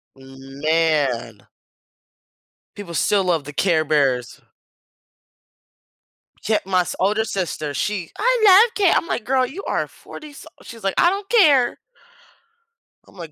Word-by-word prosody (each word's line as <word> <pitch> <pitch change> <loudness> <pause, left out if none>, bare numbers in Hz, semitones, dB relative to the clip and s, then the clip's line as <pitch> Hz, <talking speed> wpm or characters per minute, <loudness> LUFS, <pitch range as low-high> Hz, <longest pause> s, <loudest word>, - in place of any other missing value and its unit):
Man. 135 -3 -2 1.3
People 190 -5 -9
still 195 +3 +1
love 165 -5 0
the 145 - -9
Care 160 +1 +1
Bears. 135 -5 -1 2.0
Kept 215 -3 0
my 185 -2 +1
s - - -5
older 210 +4 +1
sister, 180 -8 -4
she 195 +1 -3
"I - - +1
love 420 +5 +6
care" 390 -4 +2
I'm - - -1
like, 245 - -3
"Girl, 260 +1 +1
you 330 +11 -8
are - - -1
40-some" 295 -2 -13
she's 230 -2 -12
like, 195 - -1
"I 345 - +4
don't 395 +1 -5
care." 295 - +4 1.3
I'm - - -21
like, 165 -4 -10
190 Hz, 130 wpm, -20 LUFS, -, 2.0 s, love